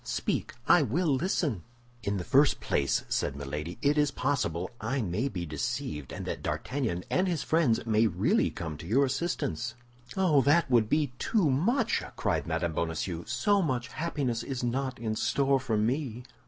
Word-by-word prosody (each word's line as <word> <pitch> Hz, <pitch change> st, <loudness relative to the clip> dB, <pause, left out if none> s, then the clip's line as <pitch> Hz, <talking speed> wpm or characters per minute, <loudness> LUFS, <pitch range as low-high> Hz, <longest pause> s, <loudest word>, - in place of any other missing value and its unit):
Speak; -, -, -2 dB
I 175 Hz, -, +7 dB
will 150 Hz, +7 st, 0 dB
listen." 135 Hz, -, 0 dB, 0.4 s
"In 100 Hz, -2 st, -1 dB
the 90 Hz, -, -3 dB
first 140 Hz, +9 st, +4 dB
place," 70 Hz, -, 0 dB
said -, -, -1 dB
Milady, 75 Hz, +5 st, -5 dB
"it 145 Hz, +1 st, +3 dB
is 150 Hz, -1 st, +3 dB
possible 95 Hz, -, -1 dB
I 125 Hz, +5 st, -1 dB
may 105 Hz, +8 st, -1 dB
be 90 Hz, -9 st, -4 dB
deceived, 75 Hz, -2 st, -3 dB
and -, -, -6 dB
that -, -, -4 dB
D'Artagnan 120 Hz, -11 st, -2 dB
and 185 Hz, +1 st, +2 dB
his 170 Hz, -5 st, -1 dB
friends 155 Hz, -10 st, +2 dB
may 110 Hz, 0 st, +3 dB
really -, -, +2 dB
come 80 Hz, -2 st, -6 dB
to 85 Hz, -, -9 dB
your 135 Hz, +8 st, +4 dB
assistance." 130 Hz, -5 st, -2 dB, 0.4 s
"Oh, 170 Hz, -7 st, +4 dB
that 145 Hz, +1 st, +3 dB
would 115 Hz, -3 st, +4 dB
be 150 Hz, -4 st, +1 dB
too 185 Hz, -11 st, +2 dB
much!" 200 Hz, -, +1 dB
cried -, -, -1 dB
Mme. 85 Hz, -, -1 dB
Bonacieux, 85 Hz, +1 st, -2 dB
"so 195 Hz, -, +2 dB
much 125 Hz, -7 st, -1 dB
happiness 140 Hz, -7 st, -2 dB
is 130 Hz, -2 st, -4 dB
not 130 Hz, +1 st, -1 dB
in 110 Hz, -3 st, -2 dB
store 135 Hz, +3 st, +2 dB
for 125 Hz, -4 st, -1 dB
me!" 125 Hz, +2 st, -1 dB
125 Hz, 170 wpm, -29 LUFS, 100-145 Hz, 0.4 s, I